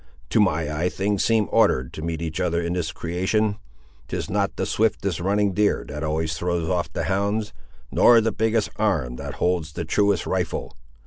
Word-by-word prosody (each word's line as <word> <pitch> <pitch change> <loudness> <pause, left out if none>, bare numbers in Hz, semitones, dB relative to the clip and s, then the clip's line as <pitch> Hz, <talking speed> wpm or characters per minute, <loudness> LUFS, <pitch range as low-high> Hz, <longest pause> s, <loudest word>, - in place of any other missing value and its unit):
To - - +3
my 75 0 +1
eye 85 +4 0
things 100 +1 0
seem 110 -2 +2
ordered 65 -1 +3
to - - -6
meet 80 0 -3
each 80 +1 -3
other 85 -2 +1
in 85 0 -2
this 85 -4 -2
creation. 95 +6 -1 0.5
'Tis - - -4
not - - 0
the - - -1
swiftest 100 -5 0
running 100 +2 +1
deer 105 +2 +1
that 75 +1 -5
always 80 +1 -1
throws 85 0 -1
off 85 0 -1
the - - -3
hounds, 100 +2 -1 0.4
nor 120 -1 +6
the 115 0 +1
biggest 110 -1 0
arm 80 - 0
that - - -6
holds 85 -3 0
the 85 - -4
truest 100 +1 +2
rifle. - - -2
90 Hz, 185 wpm, -24 LUFS, 80-105 Hz, 0.5 s, nor